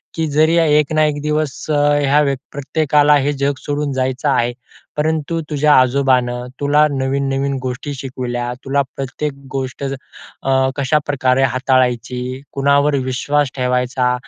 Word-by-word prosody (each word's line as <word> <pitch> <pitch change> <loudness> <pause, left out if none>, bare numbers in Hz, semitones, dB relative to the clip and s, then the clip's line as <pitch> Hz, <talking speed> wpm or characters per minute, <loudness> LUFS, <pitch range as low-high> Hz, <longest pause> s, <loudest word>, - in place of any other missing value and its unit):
की 160 - 0
जरी 155 +3 +3
एक 150 -2 +3
ना 155 0 +3
एक 145 -1 -1
दिवस 150 -2 -2
ह्या 145 -1 +3
व्यक् 140 -3 0
प्रत्येकाला 150 +1 +2
हे 140 +1 0
जग 140 0 0
सोडून 145 0 -3
जायचं 130 +2 -1
आहे. 120 -3 +1 0.4
परंतु 160 +1 -1
तुझ्या 150 0 +3
आजोबांन 130 -1 +2 0.3
तुला 145 +1 +3
नवीन-नवीन 135 0 -1
गोष्टी 130 +3 -4
शिकविल्या, 125 -2 -4
तुला 140 +1 +1
प्रत्येक 140 +2 -4 0.2
गोष्ट 130 0 -4 0.9
कशाप्रकारे 135 -2 +1
हाताळायची, 125 0 0
कुणावर 140 +1 +2
विश्वास 140 +2 0
ठेवायचा, 125 0 0
140 Hz, 120 wpm, -18 LUFS, 130-145 Hz, 0.9 s, जरी